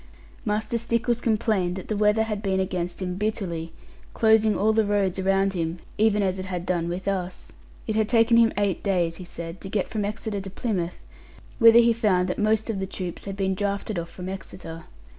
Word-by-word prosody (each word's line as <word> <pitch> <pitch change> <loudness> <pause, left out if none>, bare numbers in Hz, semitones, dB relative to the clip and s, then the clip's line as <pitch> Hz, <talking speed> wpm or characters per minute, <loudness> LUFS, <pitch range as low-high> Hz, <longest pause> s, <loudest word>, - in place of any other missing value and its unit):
Master 220 +3 0
Stickles 235 +1 0
complained 215 -5 +1
that 190 - -7
the 215 - -1
weather 210 +1 +3
had 210 -2 -3
been 190 -2 0
against 180 -1 -2
him 180 0 -3
bitterly, 185 -6 -2 0.4
closing 220 -1 +4
all 215 +2 +3
the 220 0 +3
roads 200 -3 0
around 195 +1 +2
him; 165 -1 -2 0.2
even 210 -1 +3
as 190 0 0
it 185 - -5
had 180 -2 -4
done 170 -2 0
with 180 +3 -4
us. 185 -2 -3 0.3
It 220 - -2
had 220 0 +1
taken 230 0 +5
him 230 -1 +5
eight 200 -3 0
days, 175 -4 0
he 185 - -8
said, 170 0 -7
to 195 - -7
get 200 -1 0
from 215 -2 -2
Exeter 210 0 -3
to 195 - -6
Plymouth; 185 -4 -3 0.6
whither 230 -1 +8
he 235 0 +6
found 195 -5 +2
that - - -2
most 215 +1 +2
of 220 -4 -2
the 190 - -3
troops 185 -2 -6
had 195 -1 -4
been 190 -1 +1
drafted 200 0 -2
off 170 0 -6
from 180 0 -8
Exeter. 170 -3 -7
195 Hz, 205 wpm, -25 LUFS, 180-220 Hz, 0.6 s, whither